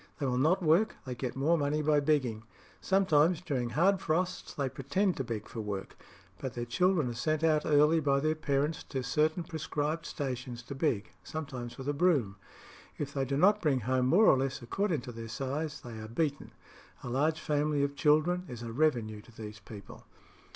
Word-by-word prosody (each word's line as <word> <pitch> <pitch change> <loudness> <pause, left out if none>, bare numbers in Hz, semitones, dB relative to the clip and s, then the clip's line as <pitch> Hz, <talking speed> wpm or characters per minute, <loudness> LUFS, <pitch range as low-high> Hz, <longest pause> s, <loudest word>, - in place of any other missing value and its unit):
They 140 - -2
will 125 -1 0
not 180 +7 +3
work; 170 +8 +3
they 130 - -4
get 125 0 -4
more 155 +5 +2
money 150 +1 0
by 150 0 +4
begging. 140 -7 +1 0.4
Sometimes 180 -4 +3
during 135 -9 -2
hard 185 +8 +2
frosts 180 +3 -1
they 140 -2 -2
pretend 140 +9 0
to 135 - -1
beg 115 -3 -5
for 115 - -6
work; 100 -2 -5 0.4
but 130 - -5
their 120 0 -3
children 165 +4 +2
are - - -4
sent 155 +6 -1
out 155 -2 +3
early 150 +2 +5
by 140 -2 +2
their 155 +2 +1
parents 150 0 -1
to 130 -2 -4
certain 155 +6 +1
prescribed 160 0 -3
stations 125 -3 -4
to 140 - -7
beg, 135 -7 -1
sometimes 130 -6 -6
with 135 0 -7
a 145 - +1
broom. 140 - +2 0.6
If 140 -1 -4
they 135 -1 0
do 135 +1 -1
not 205 +6 +4
bring 140 -6 +2
home 130 +2 +1
more 190 +11 +5
or 135 - +6
less 135 -2 -2
according 170 - -1
to 125 - -8
their 115 -1 -7
size, 140 +6 -3
they 115 -2 -8
are 110 - -7
beaten. 140 +4 -2 0.5
A - - -6
large 150 +6 +1
family 150 -1 0
of 140 0 -1
children 155 +5 +2
is 120 -5 -7
a 115 - -5
revenue 115 -6 0
to 120 - -18
these 105 -2 -9
people." 105 -2 -12
145 Hz, 195 wpm, -31 LUFS, 125-155 Hz, 0.6 s, or